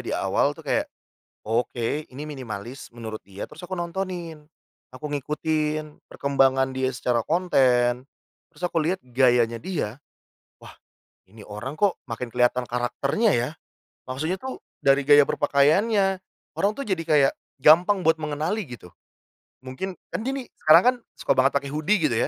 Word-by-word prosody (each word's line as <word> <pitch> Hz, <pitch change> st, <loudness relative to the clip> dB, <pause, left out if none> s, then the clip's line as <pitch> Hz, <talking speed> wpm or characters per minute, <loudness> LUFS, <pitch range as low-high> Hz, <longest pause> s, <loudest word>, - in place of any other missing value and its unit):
di -, -, -5 dB
awal -, -, +1 dB
tuh -, -, -13 dB
kayak, -, -, 0 dB, 0.6 s
"Oke 120 Hz, +5 st, -1 dB
ini 145 Hz, +4 st, -7 dB
minimalis," 125 Hz, -3 st, -7 dB
menurut 110 Hz, -2 st, -7 dB
dia. 100 Hz, +1 st, -8 dB
Terus -, -, -13 dB
aku 180 Hz, -, -10 dB
nontonin, 175 Hz, -3 st, -4 dB, 0.5 s
aku 130 Hz, +4 st, -7 dB
ngikutin 150 Hz, +1 st, -2 dB
perkembangan 135 Hz, -1 st, +2 dB
dia 130 Hz, 0 st, 0 dB
secara 120 Hz, -2 st, 0 dB
konten, 125 Hz, -7 st, +2 dB, 0.5 s
terus 155 Hz, -1 st, -18 dB
aku 165 Hz, -2 st, 0 dB
lihat 185 Hz, +4 st, 0 dB
gayanya 120 Hz, -2 st, +2 dB
dia, 160 Hz, -, -3 dB, 0.7 s
"Wah! -, -, -13 dB, 0.6 s
Ini 110 Hz, 0 st, -13 dB
orang 105 Hz, +7 st, -6 dB
kok, 205 Hz, -3 st, +3 dB, 0.2 s
makin 120 Hz, +2 st, -4 dB
kelihatan 125 Hz, +1 st, +1 dB
karakternya 140 Hz, -, 0 dB
ya," 120 Hz, +3 st, 0 dB, 0.6 s
maksudnya 155 Hz, +7 st, -1 dB
tuh, 260 Hz, +4 st, -6 dB, 0.2 s
dari 140 Hz, +1 st, +4 dB
gaya 145 Hz, 0 st, +8 dB
berpakaiannya. 190 Hz, +8 st, +2 dB, 0.4 s
Orang 205 Hz, +2 st, +2 dB
tuh -, -, -2 dB
jadi 190 Hz, -4 st, 0 dB
kayak 150 Hz, -4 st, +4 dB, 0.3 s
gampang 180 Hz, +6 st, +6 dB
buat 160 Hz, 0 st, +4 dB
mengenali, 155 Hz, +6 st, -2 dB
gitu. 120 Hz, -8 st, -11 dB, 0.8 s
Mungkin 130 Hz, +9 st, -5 dB, 0.2 s
kan -, -, -2 dB
gini, 265 Hz, -1 st, -3 dB
sekarang 155 Hz, +2 st, +7 dB
kan, 250 Hz, +1 st, +5 dB, 0.2 s
suka -, -, +1 dB
banget 130 Hz, +1 st, +4 dB
pake 140 Hz, 0 st, -5 dB
hoodie, 155 Hz, +8 st, +2 dB
gitu 120 Hz, -, -1 dB
145 Hz, 145 wpm, -24 LUFS, 125-170 Hz, 0.8 s, gaya